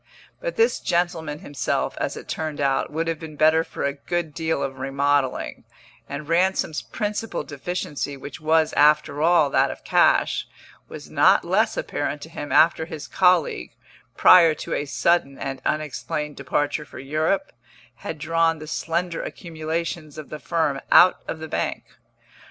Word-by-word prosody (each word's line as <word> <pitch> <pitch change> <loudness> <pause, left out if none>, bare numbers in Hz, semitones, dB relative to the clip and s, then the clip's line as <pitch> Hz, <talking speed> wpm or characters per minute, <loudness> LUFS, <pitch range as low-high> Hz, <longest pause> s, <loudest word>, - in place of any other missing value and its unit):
But - - -4
this 455 +1 +2
gentleman 170 -4 -1
himself, 145 -1 -2
as - - -2
it - - -10
turned 155 -2 -4
out, 135 -1 0
would 165 +2 -2
have 165 -2 -2
been 160 -2 -9
better 155 +2 +4
for - - -6
a 140 0 0
good 165 +2 -3
deal 160 +1 -1
of 135 -1 -5
remodelling, 135 - 0 0.5
and 140 +1 -6
Ransom's 170 -2 +1
principal 210 -2 -3
deficiency, 145 -1 -4
which 140 +1 -9
was, 160 0 +2
after 150 0 +3
all, 160 -3 +4
that 135 0 +3
of - - -8
cash, - - +3 0.4
was - - -10
not - - +4
less - - +1
apparent 145 - -3
to 160 - -10
him 145 -3 -7
after 160 0 +4
his 155 -3 -7
colleague, 180 -4 +2 0.4
prior 170 -4 +7
to - - -5
a 145 - -1
sudden 145 -2 +1
and 135 0 -5
unexplained 150 0 -3
departure 145 +3 -1
for 145 - -13
Europe, 155 +8 -1 0.5
had 160 - -6
drawn 165 +1 +1
the 155 - -9
slender 165 +2 -2
accumulations 160 -1 -5
of 155 - -8
the 155 - -7
firm 150 -5 -1
out 180 - +7
of - - -4
the 160 0 -7
bank. - - -2
155 Hz, 155 wpm, -23 LUFS, 145-170 Hz, 0.5 s, prior